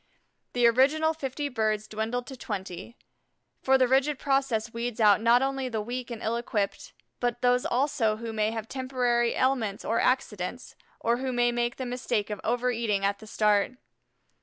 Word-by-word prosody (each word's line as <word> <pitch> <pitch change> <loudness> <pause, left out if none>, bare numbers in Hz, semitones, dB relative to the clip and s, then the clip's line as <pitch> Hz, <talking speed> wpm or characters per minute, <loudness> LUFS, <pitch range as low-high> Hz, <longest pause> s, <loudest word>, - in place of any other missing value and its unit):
The 245 -1 +3
original 285 +7 +4
fifty 290 -1 -4
birds 215 -4 -1
dwindled 220 +3 -3
to 265 - -8
twenty, 195 -1 -6 0.6
for 265 0 +4
the 255 -1 +3
rigid 270 +3 +2
process 265 -5 0
weeds 235 0 -4
out 210 -2 +5
not 235 +3 +5
only 270 -1 -1
the 225 -3 -2
weak 245 +4 -4
and 235 -2 -6
ill 225 +2 0
equipped, 210 -4 -3 0.3
but 240 0 -2
those 250 0 +3
also 255 -4 +1
who 225 0 -6
may 215 0 +1
have 225 -1 -5
temporary 250 -2 0
ailments 245 -6 0
or 230 - +1
accidents, 245 -3 -1 0.3
or 235 +1 +1
who 260 +1 -2
may 240 -1 +2
make 240 0 -1
the 260 - -5
mistake 245 -4 -2
of 210 - -4
over 245 +2 +1
eating 215 -4 0
at 200 0 0
the 220 - -12
start. 210 +1 +2
240 Hz, 175 wpm, -27 LUFS, 220-255 Hz, 0.6 s, out